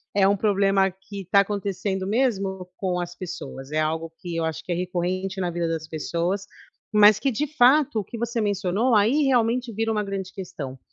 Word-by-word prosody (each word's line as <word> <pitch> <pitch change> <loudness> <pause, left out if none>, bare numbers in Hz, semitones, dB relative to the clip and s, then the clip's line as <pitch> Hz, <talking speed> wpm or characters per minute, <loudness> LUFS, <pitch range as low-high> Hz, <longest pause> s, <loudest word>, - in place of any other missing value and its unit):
é 200 -1 +5
um 200 0 +3
problema 195 -1 +3
que 195 +1 -9
está 200 +2 +4
acontecendo 195 -1 -2
mesmo 200 -5 0
com 180 -2 -1
as 175 0 -5
pessoas. 165 -7 -7
É 155 - +1
algo 160 +1 -1
que 175 -2 -5
eu 165 - 0
acho 160 -2 -4
que - - -6
é - - +1
recorrente 185 +2 -2
na 175 -1 -1
vida 170 0 -1
das 165 -1 -3
pessoas, 170 +5 -2 0.5
mas 210 0 +7
que 275 - +1
de 290 +7 -1
fato, 265 0 +5
o - - -2
que 235 - -8
você 235 +1 -2
mencionou 205 +4 +1
aí 230 +9 +4
realmente 245 -2 +1
vira 225 +2 -1
uma 215 -1 0
grande 195 -2 -4
questão, 155 -9 -7
195 Hz, 200 wpm, -24 LUFS, 175-215 Hz, 0.5 s, mas